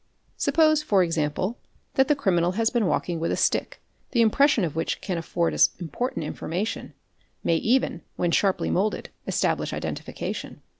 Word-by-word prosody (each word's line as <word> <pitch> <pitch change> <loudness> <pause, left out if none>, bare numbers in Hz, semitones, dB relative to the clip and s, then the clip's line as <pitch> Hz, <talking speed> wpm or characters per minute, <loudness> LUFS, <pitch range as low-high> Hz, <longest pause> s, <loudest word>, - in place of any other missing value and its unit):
) - - -40
Suppose 310 -2 +3
for 200 -10 +3
example, 165 +6 -1 0.3
that 265 -1 +3
the 295 - +3
criminal 175 -8 +1
has 225 +2 +1
been 235 -6 +1
walking 175 -2 -1
with 165 - -1
a - - 0
stick - - 0 0.3
the 235 - +4
impression 245 +1 +4
of 160 -4 -2
which 160 - -1
can 180 -4 -3
afford 170 0 -1
us - - +5
important 175 - -3
information, 180 +7 -4 0.5
may 165 - +2
even, 235 -4 +1
when 175 -1 0
sharply 195 +2 +1
moulded, 205 +3 0 0.2
establish - - 0
identification. - - -5
190 Hz, 160 wpm, -25 LUFS, 170-240 Hz, 0.5 s, us